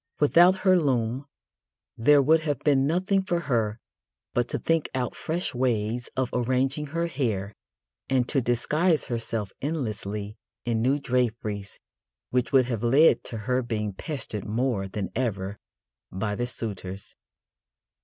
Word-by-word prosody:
Without 175 Hz, +5 st, +6 dB
her 185 Hz, -1 st, +6 dB
loom 130 Hz, -2 st, 0 dB, 0.7 s
there 140 Hz, +5 st, +5 dB
would 160 Hz, +4 st, +5 dB
have 150 Hz, -3 st, -1 dB
been 140 Hz, -2 st, +3 dB
nothing 185 Hz, +5 st, +2 dB
for 175 Hz, -2 st, -1 dB
her 115 Hz, -7 st, 0 dB, 0.5 s
but 120 Hz, -1 st, +1 dB
to -, -, -1 dB
think 165 Hz, -2 st, 0 dB
out 125 Hz, -3 st, -2 dB
fresh 160 Hz, -2 st, -2 dB
ways 120 Hz, -2 st, -1 dB
of 130 Hz, -1 st, 0 dB
arranging 130 Hz, +4 st, 0 dB
her 165 Hz, +3 st, -1 dB
hair 110 Hz, -, -2 dB, 0.6 s
and 130 Hz, -2 st, +2 dB
to 135 Hz, -, +1 dB
disguise 150 Hz, +8 st, +1 dB
herself 115 Hz, -4 st, -3 dB
endlessly 105 Hz, -8 st, -3 dB, 0.3 s
in 115 Hz, -2 st, 0 dB
new 130 Hz, +4 st, +3 dB
draperies 115 Hz, -7 st, -2 dB, 0.5 s
which 125 Hz, -1 st, +1 dB
would 135 Hz, -3 st, +5 dB
have 120 Hz, -4 st, -3 dB
led 125 Hz, +2 st, +5 dB
to 115 Hz, -, -5 dB
her 125 Hz, 0 st, +1 dB
being 105 Hz, -4 st, -2 dB
pestered 120 Hz, -, -5 dB
more 110 Hz, -2 st, -1 dB
than 95 Hz, -1 st, -4 dB
ever 100 Hz, -5 st, -2 dB, 0.5 s
by 105 Hz, +3 st, -2 dB
the 120 Hz, +4 st, -2 dB
suitors. 100 Hz, -5 st, -5 dB
125 Hz, 140 wpm, -26 LUFS, 110-145 Hz, 0.7 s, Without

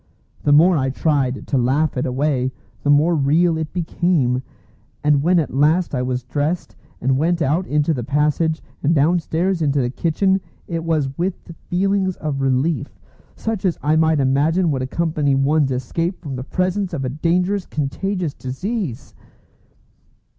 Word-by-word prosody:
The 145 Hz, -, +1 dB
more 165 Hz, +4 st, +6 dB
I 135 Hz, 0 st, 0 dB
tried 135 Hz, -2 st, 0 dB
to 135 Hz, -, 0 dB
laugh 135 Hz, +6 st, +1 dB
it 125 Hz, -, -1 dB
away, 130 Hz, 0 st, 0 dB, 0.3 s
the 145 Hz, -, -1 dB
more 150 Hz, +4 st, +4 dB
real 160 Hz, +3 st, +3 dB
it 155 Hz, -1 st, -4 dB
became; 165 Hz, -7 st, 0 dB, 0.6 s
and 150 Hz, -1 st, +3 dB
when 175 Hz, +4 st, +3 dB
at 160 Hz, -5 st, 0 dB
last 155 Hz, +6 st, +2 dB
I 125 Hz, -, 0 dB
was 125 Hz, 0 st, -2 dB
dressed, 150 Hz, +7 st, -2 dB, 0.2 s
and 130 Hz, +1 st, +1 dB
went 170 Hz, +3 st, +1 dB
out 160 Hz, +4 st, 0 dB
into 150 Hz, +2 st, +1 dB
the 125 Hz, -4 st, -3 dB
passage, 150 Hz, +4 st, 0 dB, 0.2 s
and 155 Hz, +3 st, +2 dB
downstairs 170 Hz, +4 st, +1 dB
into 145 Hz, -2 st, +1 dB
the 120 Hz, -2 st, 0 dB
kitchen, 190 Hz, +6 st, +1 dB, 0.3 s
it 165 Hz, -2 st, -3 dB
was 150 Hz, -5 st, 0 dB
with 175 Hz, -1 st, -3 dB, 0.2 s
feelings 190 Hz, 0 st, +1 dB
of 145 Hz, -3 st, -3 dB
relief, 135 Hz, +2 st, 0 dB, 0.4 s
such 220 Hz, -3 st, -3 dB
as 185 Hz, -4 st, +1 dB
I 150 Hz, +2 st, +2 dB
might 160 Hz, -1 st, +3 dB
imagine 150 Hz, +6 st, +2 dB
would 135 Hz, -2 st, -1 dB
accompany 150 Hz, 0 st, 0 dB
one's 140 Hz, +1 st, +2 dB
escape 165 Hz, +9 st, -2 dB
from 145 Hz, -6 st, -6 dB
the 125 Hz, -, -5 dB
presence 185 Hz, +5 st, -1 dB
of 135 Hz, -, -2 dB
a -, -, -1 dB
dangerous 180 Hz, +7 st, 0 dB
contagious 165 Hz, +3 st, -2 dB
disease. 145 Hz, -, -4 dB
155 Hz, 160 wpm, -20 LUFS, 135-175 Hz, 0.6 s, more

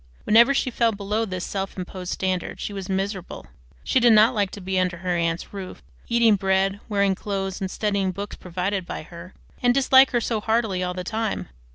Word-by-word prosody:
Whenever 235 Hz, +5 st, +6 dB
she 270 Hz, -2 st, 0 dB
fell 230 Hz, -1 st, +2 dB
below 210 Hz, +2 st, -2 dB
this 185 Hz, -3 st, -4 dB
self 195 Hz, 0 st, -4 dB
imposed 180 Hz, 0 st, -6 dB
standard 185 Hz, -2 st, -2 dB
she 205 Hz, -, -4 dB
was 195 Hz, -1 st, -6 dB
miserable. 190 Hz, -1 st, -3 dB, 0.4 s
She -, -, +2 dB
did 240 Hz, -2 st, +6 dB
not 220 Hz, +3 st, +6 dB
like 205 Hz, -4 st, 0 dB
to -, -, -7 dB
be 190 Hz, 0 st, -1 dB
under 180 Hz, -1 st, 0 dB
her 180 Hz, 0 st, -2 dB
aunt's 170 Hz, +2 st, -2 dB
roof, 190 Hz, -2 st, -8 dB, 0.2 s
eating 230 Hz, -3 st, +4 dB
bread, 195 Hz, +1 st, +1 dB
wearing 200 Hz, -2 st, +2 dB
clothes, 195 Hz, 0 st, -4 dB
and 190 Hz, -, -2 dB
studying 200 Hz, -2 st, -1 dB
books 200 Hz, +3 st, -6 dB
provided 185 Hz, +2 st, -3 dB
by -, -, -5 dB
her, 170 Hz, +3 st, -12 dB, 0.3 s
and 245 Hz, 0 st, +3 dB
dislike 265 Hz, 0 st, +6 dB
her 240 Hz, -, +1 dB
so 225 Hz, -2 st, -2 dB
heartily 220 Hz, -4 st, 0 dB
all 180 Hz, 0 st, -2 dB
the 180 Hz, -, -4 dB
time. 220 Hz, -, -3 dB
195 Hz, 200 wpm, -24 LUFS, 185-220 Hz, 0.4 s, Whenever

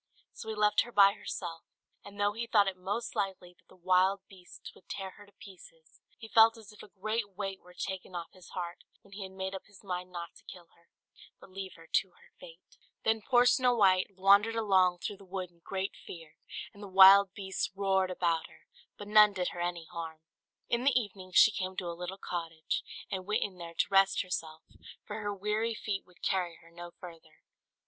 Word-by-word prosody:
So 220 Hz, -, -8 dB
he 220 Hz, -, -3 dB
left 210 Hz, 0 st, +3 dB
her 240 Hz, -, -6 dB
by 200 Hz, -2 st, +6 dB
herself, 165 Hz, -5 st, -6 dB, 0.4 s
and 205 Hz, 0 st, -12 dB
though 205 Hz, 0 st, +2 dB
he 230 Hz, +2 st, -4 dB
thought 205 Hz, -3 st, +4 dB
it 190 Hz, -, -1 dB
most 205 Hz, +6 st, -4 dB
likely 190 Hz, -3 st, -3 dB
that -, -, -33 dB
the -, -, -19 dB
wild 185 Hz, +2 st, +2 dB
beasts 185 Hz, -2 st, -13 dB
would -, -, -22 dB
tear 190 Hz, -1 st, -5 dB
her 205 Hz, +1 st, -16 dB
to -, -, -21 dB
pieces, 165 Hz, -4 st, -16 dB, 0.2 s
he 225 Hz, -, -10 dB
felt 225 Hz, +1 st, +6 dB
as 215 Hz, -2 st, -13 dB
if 210 Hz, -, -14 dB
a -, -, -11 dB
great 210 Hz, 0 st, -3 dB
weight 195 Hz, -1 st, -4 dB
were 180 Hz, 0 st, -18 dB
taken 190 Hz, -1 st, -5 dB
off 170 Hz, -1 st, -5 dB
his 185 Hz, -2 st, -15 dB
heart 175 Hz, -1 st, -5 dB, 0.2 s
when 200 Hz, -, -21 dB
he 205 Hz, -, -8 dB
had 190 Hz, -1 st, -6 dB
made 190 Hz, 0 st, -5 dB
up 190 Hz, -, -8 dB
his 200 Hz, 0 st, -18 dB
mind 180 Hz, -1 st, -5 dB
not 170 Hz, -1 st, -7 dB
to -, -, -20 dB
kill 175 Hz, -2 st, -12 dB
her, 170 Hz, -, -29 dB, 0.5 s
but -, -, -16 dB
leave 190 Hz, -1 st, -7 dB
her 165 Hz, -, -15 dB
to -, -, +1 dB
her -, -, -23 dB
fate. -, -, -15 dB, 0.3 s
Then 220 Hz, 0 st, +2 dB
poor 245 Hz, +2 st, +4 dB
Snow 250 Hz, 0 st, +4 dB
White 190 Hz, -2 st, +3 dB
wandered 200 Hz, +4 st, +5 dB
along 185 Hz, -5 st, +3 dB
through 205 Hz, -, -4 dB
the 200 Hz, -, -15 dB
wood 185 Hz, -1 st, -5 dB
in 170 Hz, -, -29 dB
great 195 Hz, 0 st, -3 dB
fear; 165 Hz, -2 st, -11 dB, 0.4 s
and 205 Hz, -, -14 dB
the 205 Hz, -, -7 dB
wild 195 Hz, +1 st, +8 dB
beasts 190 Hz, -3 st, -3 dB
roared 190 Hz, -1 st, +1 dB
about 170 Hz, -3 st, 0 dB
her, 160 Hz, -, -21 dB, 0.3 s
but 205 Hz, -, -8 dB
none 210 Hz, 0 st, +7 dB
did 180 Hz, -2 st, -1 dB
her 175 Hz, -, -6 dB
any 175 Hz, -1 st, -3 dB
harm. 165 Hz, -2 st, -7 dB, 0.5 s
In 235 Hz, +1 st, 0 dB
the 260 Hz, -2 st, +4 dB
evening 190 Hz, -4 st, -8 dB
she 220 Hz, -, +7 dB
came 185 Hz, -1 st, -4 dB
to 180 Hz, -, -3 dB
a 170 Hz, -, -3 dB
little 180 Hz, +2 st, -6 dB
cottage, 165 Hz, -4 st, -4 dB, 0.3 s
and 185 Hz, -1 st, -4 dB
went 210 Hz, -, +1 dB
in 190 Hz, -3 st, -6 dB
there 170 Hz, -1 st, -8 dB
to -, -, +1 dB
rest 195 Hz, 0 st, +4 dB
herself, 160 Hz, -3 st, -5 dB, 0.4 s
for 210 Hz, +1 st, -6 dB
her 205 Hz, -1 st, -2 dB
weary 210 Hz, +3 st, -1 dB
feet 205 Hz, -2 st, -4 dB
would 180 Hz, -, -24 dB
carry 180 Hz, -3 st, 0 dB
her 165 Hz, +1 st, -19 dB
no 175 Hz, +1 st, -9 dB
further. 165 Hz, -3 st, -13 dB
190 Hz, 215 wpm, -31 LUFS, 180-205 Hz, 0.5 s, wild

